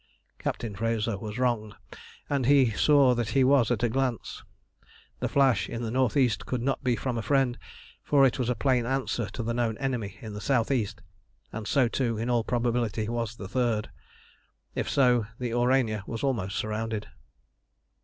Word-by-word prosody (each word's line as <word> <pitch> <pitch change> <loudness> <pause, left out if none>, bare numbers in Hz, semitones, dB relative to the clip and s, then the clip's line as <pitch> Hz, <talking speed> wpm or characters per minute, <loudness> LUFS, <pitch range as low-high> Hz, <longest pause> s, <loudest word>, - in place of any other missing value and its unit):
Captain 110 -4 -3
Frazer 115 0 -1
was 105 +3 -6
wrong, 115 -4 0 0.5
and 140 -4 0
he 135 -4 +5
saw 140 +3 +4
that 120 -3 -1
he 135 - +5
was 130 -3 +4
at 120 -2 0
a - - +4
glance. 125 -1 -2 0.8
The - - -1
flash 135 -3 +3
in 120 0 -4
the 110 - -3
north 130 +3 +1
east 125 -5 +1
could 125 -2 -2
not 135 +1 -1
be 125 -2 +2
from 120 -1 -2
a - - -1
friend, 130 +2 +2 0.5
for 140 -2 +4
it 130 0 +1
was 125 -2 0
a 125 - +1
plain 125 -1 +1
answer 130 -4 -1
to 120 - -5
the 115 +1 -2
known 115 -2 -1
enemy 125 -7 -3
in 110 -2 -8
the 105 - -6
south 115 +3 +1
east, 105 -5 -1 0.5
and 110 -1 -5
so 135 -4 +3
too 115 -1 -1
in 115 +3 -1
all 120 -2 +2
probability 120 -2 -1
was 115 -2 -3
the 95 - -7
third. 115 -2 -1 0.8
If - - -2
so, 125 -5 +3
the 125 -2 -3
Aurania 120 -3 +2
was 115 +2 -5
almost 105 -8 -1
surrounded. 110 0 -3
120 Hz, 185 wpm, -27 LUFS, 110-130 Hz, 0.8 s, he